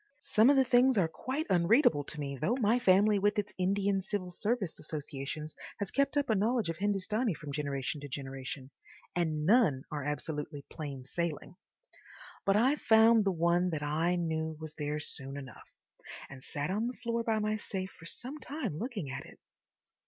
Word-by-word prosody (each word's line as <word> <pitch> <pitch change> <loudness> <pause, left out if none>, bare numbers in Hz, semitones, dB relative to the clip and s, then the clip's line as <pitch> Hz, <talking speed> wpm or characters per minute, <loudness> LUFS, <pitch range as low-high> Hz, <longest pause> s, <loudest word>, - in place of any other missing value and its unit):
Some 220 +4 +5
of 285 - +6
the 265 - +6
things 255 0 +4
are 180 -4 +4
quite 265 - -3
unreadable 175 - +4
to 150 - -6
me—though 145 - -1
my 230 +2 +3
family, 205 -1 +4
with 205 +2 +2
its 210 - -2
Indian 195 +1 +1
Civil 190 -1 -4
Service 205 -1 -2
associations, 150 0 -6 0.2
has 200 -2 -3
kept 280 +1 +1
up 285 -1 +2
a 220 - +3
knowledge 220 -1 +1
of 165 - -8
Hindustani 205 +1 0
from 145 -1 -8
generation 140 0 -3
to 145 - -6
generation—and 140 +4 -5
none 185 - +4
are 150 -2 -3
absolutely 150 0 -4
plain 140 -4 -6
sailing. 170 +3 -3 0.9
But 195 - +5
I 260 +7 +4
found 225 -2 +5
the 195 - +3
one 175 +1 +2
that 155 -3 -3
I 160 +4 +1
knew 160 -2 -2
was 155 -1 -7
there 150 0 -3
soon 140 -2 0
enough, 135 -2 -10 0.6
and 130 -1 -10
sat 145 +2 -3
on 215 +4 0
the 250 - -5
floor 235 0 0
by 225 -1 +1
my 215 0 0
safe 190 -2 -5
for 165 - -13
some 265 - -5
time 280 - -4
looking 210 - -4
at 135 0 -6
it. - - -15
180 Hz, 175 wpm, -31 LUFS, 150-220 Hz, 0.9 s, of